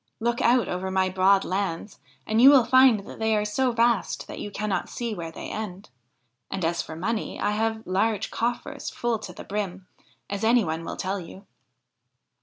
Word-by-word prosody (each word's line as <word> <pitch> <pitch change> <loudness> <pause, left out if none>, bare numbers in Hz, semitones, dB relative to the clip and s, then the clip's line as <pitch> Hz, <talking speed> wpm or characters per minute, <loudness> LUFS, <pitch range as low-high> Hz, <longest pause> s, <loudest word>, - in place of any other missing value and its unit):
Look 235 +1 0
out 245 0 +4
over 185 +1 -3
my 190 0 +1
broad 190 +1 +3
lands 195 0 -3 0.3
and 220 +1 +2
you 265 - +10
will 270 -4 +6
find 260 -5 +6
that - - -11
they 220 0 +2
are 210 - 0
so 250 +5 +1
vast 230 -3 +1
that - - -8
you - - -5
cannot 205 -1 -2
see 235 -2 -4
where 170 -4 -5
they - - -7
end; 200 -5 -6 0.6
and, 190 -3 -2
as 170 +1 0
for 160 - -8
money, 215 +7 -3
I 205 - +1
have 220 +1 -1
large 200 +3 0
coffers 240 +1 -3
full 235 -2 -2
to 200 - -8
the 180 - -10
brim, 195 -2 -4 0.4
as 200 +1 -4
any 230 +1 +4
one 160 +1 -3
will - - -6
tell 195 +1 -2
you.' 190 +3 -11
210 Hz, 195 wpm, -25 LUFS, 190-230 Hz, 0.6 s, you